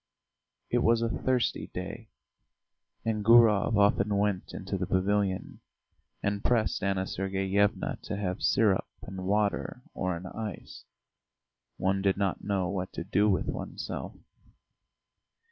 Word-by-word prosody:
It - - +3
was 115 0 +3
a 115 - +1
thirsty 130 +1 0
day, - - -6 1.0
and 110 -2 0
Gurov 115 -2 +6
often 100 0 +3
went 100 -2 0
into 95 +1 -4
the 95 -1 -2
pavilion, 95 0 0 0.6
and 100 0 -1
pressed 115 -3 +1
Anna 95 -1 0
Sergeyevna 95 +1 0
to 100 - -4
have 95 -3 -3
syrup 105 -4 +3 0.2
and 95 -1 -6
water 105 +4 0
or 90 -1 -1
an 90 - -9
ice. 105 0 -7 0.9
One 95 +1 +1
did 95 -1 +2
not 100 -2 -1
know 95 -3 0
what 95 0 -3
to - - -4
do 100 +3 +2
with 95 - +1
oneself. - - -5
100 Hz, 130 wpm, -29 LUFS, 95-105 Hz, 1.0 s, Gurov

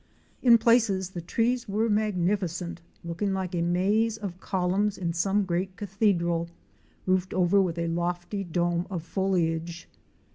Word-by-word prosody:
In 240 -2 +7
places 220 -5 +2
the 175 - -5
trees 235 +7 0
were 215 +3 +1
magnificent, 185 -4 -1 0.2
looking 170 +4 -2
like 190 -1 -3
a 175 - 0
maze 200 +6 +1
of 195 -4 -6
columns 190 +2 0
in 170 -3 -2
some 195 +4 +1
great 185 +1 -2
cathedral, 175 -5 0 0.6
roofed 185 0 0
over 185 +2 +4
with 175 -3 -1
a 170 0 -1
lofty 175 +4 -2
dome 175 0 -1
of 175 -4 -4
foliage. 170 -3 -1
185 Hz, 140 wpm, -27 LUFS, 170-205 Hz, 0.6 s, In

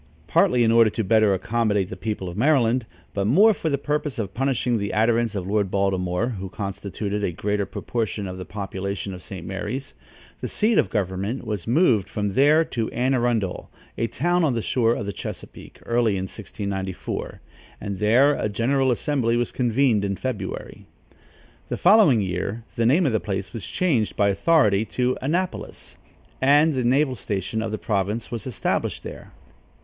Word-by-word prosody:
Partly 125 -1 +3
in 115 - +3
order 115 -1 +6
to 110 - -2
better 110 +1 +4
accommodate 105 0 0
the - - -6
people 95 -1 -4
of 85 - -6
Maryland, 125 -1 +2 0.3
but 100 0 -1
more 205 - +6
for 165 - -3
the 140 - +1
purpose 150 0 -2
of 100 -4 -3
punishing 125 -2 0
the 100 0 -3
adherents 115 0 +2
of 95 -3 -3
Lord 100 0 0
Baltimore, 95 +2 0
who 95 -5 -5
constituted 100 +1 -4
a 90 - 0
greater 105 +3 -2
proportion 110 -1 -3
of 90 0 -7
the - - -4
population 100 0 -5
of 90 - -9
St. 95 -1 -8
Mary's, 105 +8 -5 0.5
the - - -4
seat 215 +1 +2
of - - +2
government 100 +4 -2
was 105 -6 -4
moved 120 - +3
from 105 -2 -2
there 150 +7 +5
to 115 -7 -3
Anne 130 +3 0
Arundel, 120 -7 -1 0.3
a 115 - -1
town 175 +8 +1
on 140 -6 +2
the 115 - -1
shore 120 -2 +2
of - - -4
the 100 - -4
Chesapeake, - - -9
early 115 -2 +2
in 95 -1 -2
1694, 95 -2 -5 0.4
and 100 -3 -5
there 125 +7 +4
a 110 - -2
general 130 +5 +1
assembly 125 -2 +1
was 120 - 0
convened 120 -3 +2
in 100 -1 -1
February. 130 +1 -5 0.8
The - - -2
following 195 - +5
year, 95 +4 -3
the 115 -1 +2
name 160 +8 +4
of 135 - +2
the 110 - +1
place 95 -2 -4
was 115 - -6
changed 135 - 0
by 100 -1 +3
authority 105 -3 +3
to 125 0 +2
Annapolis, 175 +7 -3 0.5
and 145 +4 +5
the 130 -2 -1
naval 130 +3 +2
station 105 0 -3
of 110 -1 -3
the 110 - -2
province 105 +2 -2
was 120 +2 -5
established 125 - -2
there. - - -9
110 Hz, 175 wpm, -23 LUFS, 100-130 Hz, 0.8 s, order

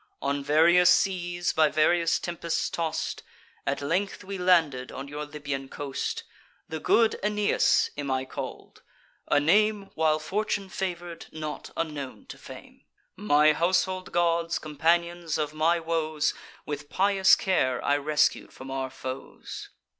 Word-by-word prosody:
On 140 +1 -1
various 170 +5 +5
seas 175 -2 +1
by 155 -1 +4
various 165 +2 +3
tempests 170 -1 -3
toss'd, 165 -2 -2 0.5
At 140 +1 -1
length 185 +8 -1
we 195 0 -6
landed 160 -8 +2
on 135 +1 -7
your 150 +1 -5
Libyan 145 -2 -5
coast. 140 -2 -4 0.4
The 160 0 -5
good 225 +7 +3
Aeneas 210 0 +2
am 145 -1 -4
I 130 0 0
call'd, 130 - -8 0.5
a - - +4
name, 200 +6 +2
While 155 -1 +2
Fortune 200 +4 -2
favour'd, 175 -3 -5
not 155 -1 -6
unknown 150 -5 -4
to - - -9
fame. - - -12 0.3
My 155 -6 +4
household 185 +3 0
gods, 170 -1 +1
companions 170 +2 0
of 150 -1 -2
my 165 +3 +2
woes, 155 -2 -1 0.3
With 145 -1 -5
pious 195 -1 +4
care 130 -10 +1
I 145 - +3
rescued 150 +1 +1
from 135 0 -10
our 135 0 -2
foes. 130 0 -8
160 Hz, 135 wpm, -27 LUFS, 145-180 Hz, 0.5 s, various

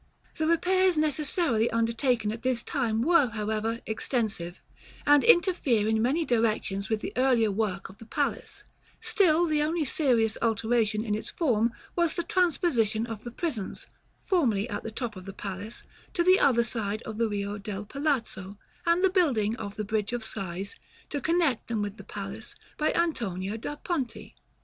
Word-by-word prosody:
§ - - -33 0.3
XXIX. - - -20
The 315 - +1
repairs 365 +2 +3
necessarily 300 -5 +2
undertaken 230 -1 +1
at 230 +1 -6
this 255 -2 +1
time 230 -5 0
were 335 -2 +5
however 220 +1 -2
extensive, 215 -6 -2 0.5
and 290 -1 +6
interfere 345 - +4
in 220 0 +2
many 290 +8 +1
directions 215 -5 0
with 220 -1 0
the - - -5
earlier 245 -4 +3
work 195 -2 -2
of 190 - -15
the 225 - -12
palace: 285 +4 -2 0.4
still 345 -4 +3
the 305 -2 +1
only 315 +1 0
serious 240 -6 +2
alteration 225 -1 +1
in 210 - -1
its 215 - -3
form 235 -8 +1 0.2
was 340 -2 +2
the 345 - -1
transposition 285 - +1
of 225 -2 -7
the 240 - -5
prisons, 240 - -4 0.4
formerly 235 - +2
at 205 - -3
the - - -5
top 225 -1 -4
of 185 -1 -10
the 195 - -7
palace, 200 +3 -6 0.3
to 345 - +3
the 370 +2 +6
other 235 -4 +4
side 215 -3 -2
of 220 0 -6
the 230 - +3
Rio 205 -1 -3
del 200 0 -5
Palazzo; 225 -7 -2 0.3
and 340 +2 +3
the 380 - +6
building 250 - +2
of 200 -2 -6
the 215 - -3
Bridge 215 +2 -1
of 240 -2 -2
Sighs, 195 -2 -4 0.4
to 285 - -2
connect 325 -5 +1
them 225 -3 -1
with 205 +1 -5
the - - -10
palace, - - -7 0.2
by 305 - +1
Antonio 210 - -1
da 230 +6 -5
Ponte. 275 - -4
230 Hz, 175 wpm, -28 LUFS, 215-300 Hz, 0.5 s, and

